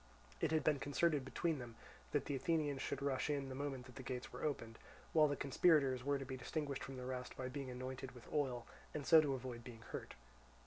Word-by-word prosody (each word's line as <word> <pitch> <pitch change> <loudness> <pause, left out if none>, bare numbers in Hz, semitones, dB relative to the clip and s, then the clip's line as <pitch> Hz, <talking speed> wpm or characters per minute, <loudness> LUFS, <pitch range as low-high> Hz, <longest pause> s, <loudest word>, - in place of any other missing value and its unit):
It - - +2
had 160 0 +2
been 150 -3 +3
concerted 145 +1 +2
between 155 +3 0
them 120 -2 -7 0.3
that 145 -2 +1
the 145 - -1
Athenians 150 -2 +1
should - - -2
rush 140 0 +1
in, 140 -2 0
the - - -4
moment 135 -2 -3
that 130 0 -12
the - - -4
gates 125 -1 -4
were - - -6
opened, 115 -7 -2 0.3
while 155 -2 +7
the 145 - 0
conspirators 135 -2 +4
were 140 +1 +2
to 135 - -5
be 130 0 -4
distinguished 140 +2 -2
from 135 -1 -6
the 125 - -5
rest 125 -1 -4
by 130 -1 -2
being 135 0 -4
anointed 130 +1 -5
with 120 - -12
oil, 130 -5 +1 0.3
and 145 -2 -2
so 160 -2 +9
to 140 -3 +1
avoid 125 -2 -5
being 115 -2 -9
hurt. - - -5
135 Hz, 225 wpm, -40 LUFS, 130-145 Hz, 0.3 s, so